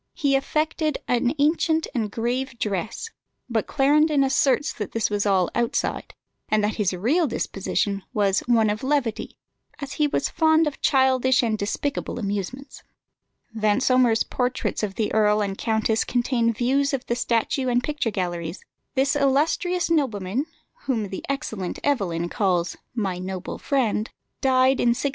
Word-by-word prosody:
He 280 -2 +2
affected 305 +2 0
an 245 +3 +1
ancient 320 +2 +2
and 225 -5 -1
grave 240 +3 -2
dress; 210 - -3 0.4
but 225 -3 -1
Clarendon 295 +1 +3
asserts 270 +1 +2
that 210 -4 -6
this 225 -2 0
was 205 0 0
all 190 -3 +2
outside, 235 -1 -1 0.3
and 215 -1 +2
that 210 +1 -1
his 205 -4 +1
real 255 - +1
disposition 200 -3 -2
was 200 -2 +2
"one 225 -3 +3
of 210 - -4
levity," 265 -5 -1 0.4
as 280 -2 -6
he 300 - +5
was - - 0
fond 320 0 +3
of 295 -2 -4
childish 260 -2 +3
and 225 -2 +1
despicable 215 +9 -3
amusements. 205 +5 -4 0.7
Vansomer's 230 +2 +3
portraits 250 0 -2
of 200 -3 -3
the 220 - -1
earl 210 -1 +3
and 200 -2 -1
countess 220 -1 +1
contain 240 -1 +1
views 270 +5 +1
of 265 - -6
the 235 - -1
statue 245 +2 0
and 245 0 +1
picture 295 -6 -1
galleries. 175 -4 -4 0.3
This 270 +2 +2
illustrious 305 +6 +1
nobleman, 250 - 0 0.4
whom 225 -7 -1
the 190 - -6
excellent 220 -10 -3
Evelyn 180 -12 0
calls 180 -2 0 0.2
"my 195 -6 -2
noble 185 0 -5
friend," 235 -6 0 0.3
died 260 0 +3
in 235 -1 +3
1646. 280 - 0
240 Hz, 150 wpm, -24 LUFS, 210-275 Hz, 0.7 s, he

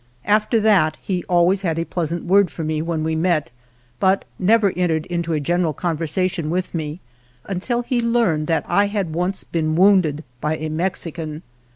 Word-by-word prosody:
After 215 +2 +2
that 195 -8 +3
he 180 -3 -3
always 180 +1 +3
had 165 -4 -1
a 165 - -1
pleasant 170 -1 -3
word 195 +1 +4
for 165 - -6
me 155 0 -1
when 165 -1 -2
we 160 0 -1
met, 160 -4 0 0.5
but 190 0 +2
never 205 +1 +4
entered 165 -3 0
into 170 -1 -3
a 155 - +1
general 170 +2 0
conversation 165 +1 -1
with 185 +2 -2
me 160 +1 -4 0.4
until 235 +6 -2
he 240 0 0
learned 230 -10 +1
that 165 - 0
I 200 0 +3
had 200 -6 -2
once 180 +3 -1
been 155 -2 -1
wounded 180 -5 +4 0.2
by 155 +1 0
c 155 0 -4
Mexican. 165 -2 -3
175 Hz, 175 wpm, -21 LUFS, 160-195 Hz, 0.5 s, word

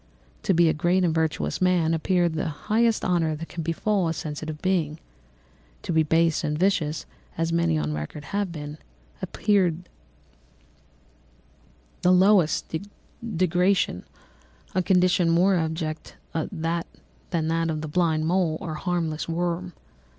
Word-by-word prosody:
To 190 - +1
be 170 0 +5
a 160 - +3
great 175 +4 +2
and 170 -3 +2
virtuous 160 +2 -1
man 175 -3 +3
appeared 175 +1 +1
the 160 - -2
highest 220 +9 +1
honour 165 -3 +1
that 165 +2 -8
can 170 - -5
befall 175 +4 0
a 165 - 0
sensitive 155 0 -5
being; 165 -5 0 0.9
to 175 - -2
be 160 - +4
base 165 +1 +2
and 150 0 -1
vicious, 165 -4 +1 0.3
as 165 0 0
many 170 - +2
on 75 0 -1
record 75 - -6
have 200 -3 0
been, 150 -1 -7 0.4
appeared 180 -5 +1 2.1
the 180 - +4
lowest 185 -4 +3 0.6
degradation, 180 - +2 0.7
a 185 - +2
condition 180 -1 +3
more 180 +4 +4
abject 160 -2 -2 0.2
than 160 -2 -2
that 165 0 -3
of 155 -1 -2
the 155 - -4
blind 160 -1 +1
mole 170 -2 +1
or 170 -5 -5
harmless 165 -1 -2
worm. 175 +1 -2
165 Hz, 135 wpm, -25 LUFS, 155-180 Hz, 2.1 s, be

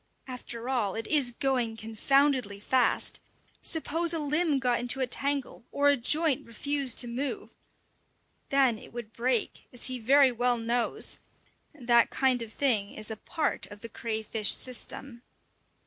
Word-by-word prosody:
After 245 -2 -7
all, 235 -7 0
it 225 0 -4
is 285 -3 +3
going 245 -2 -1
confoundedly 240 0 +1
fast! 255 +4 +1 0.4
Suppose 330 +1 0
a - - -1
limb 300 0 +1
got 250 -2 +1
into 245 +3 +2
a 260 - +2
tangle, 275 0 -1
or 285 0 +3
a 285 - +5
joint 300 +3 +1
refused 275 +2 +1
to 245 - -3
move! 275 - -4 1.0
Then 265 -5 +3
it - - -13
would 235 -3 -8
break, 240 -1 -1
as 245 - -3
he 255 -1 -2
very 270 +3 +5
well 245 0 +1
knows: 235 +1 -1 0.6
that 240 -4 +3
kind 260 -2 +1
of 225 -2 -6
thing 220 -7 +1
is 215 +1 -2
a - - -4
part 315 +8 -2
of 205 0 -12
the 230 - -7
crayfish 220 -1 0
system! 255 0 -4
250 Hz, 150 wpm, -28 LUFS, 230-275 Hz, 1.0 s, a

